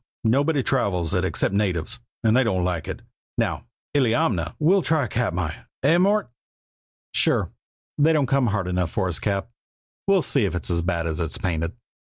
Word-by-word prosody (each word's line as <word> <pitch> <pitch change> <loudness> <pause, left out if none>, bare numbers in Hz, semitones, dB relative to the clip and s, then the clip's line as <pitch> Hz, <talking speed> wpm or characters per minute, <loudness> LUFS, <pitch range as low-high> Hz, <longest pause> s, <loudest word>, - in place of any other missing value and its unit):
Nobody 140 +5 +2
travels 95 - 0
it 90 -1 +1
except 95 +1 0
natives, 100 +2 -1 0.2
and 110 0 +4
they 130 - +5
don't 95 -6 0
like 90 -3 -2
it. - - -6 0.3
Now, - - -1 0.3
Illiamna 110 - +1
" - - -46
"We'll 185 +6 +4
try 160 -4 +1
Katmai. 90 -9 -1 0.3
Eh, 160 +5 +5
Mort?" 200 - +2 0.8
"Sure! - - +2 0.5
They 155 +2 +5
don't 150 -3 +3
come 135 -1 +2
hard 100 -4 -1
enough 90 -2 0
for 95 +3 -1
us, 85 - -1
Cap. 100 +2 -2 0.6
We'll 195 -3 +4
see 135 -7 +2
if 95 - -2
it's 90 - -2
as 85 0 +1
bad 85 -1 -1
as 80 0 -2
it's 80 -2 -2
painted." 85 -2 -2
105 Hz, 180 wpm, -24 LUFS, 90-135 Hz, 0.8 s, they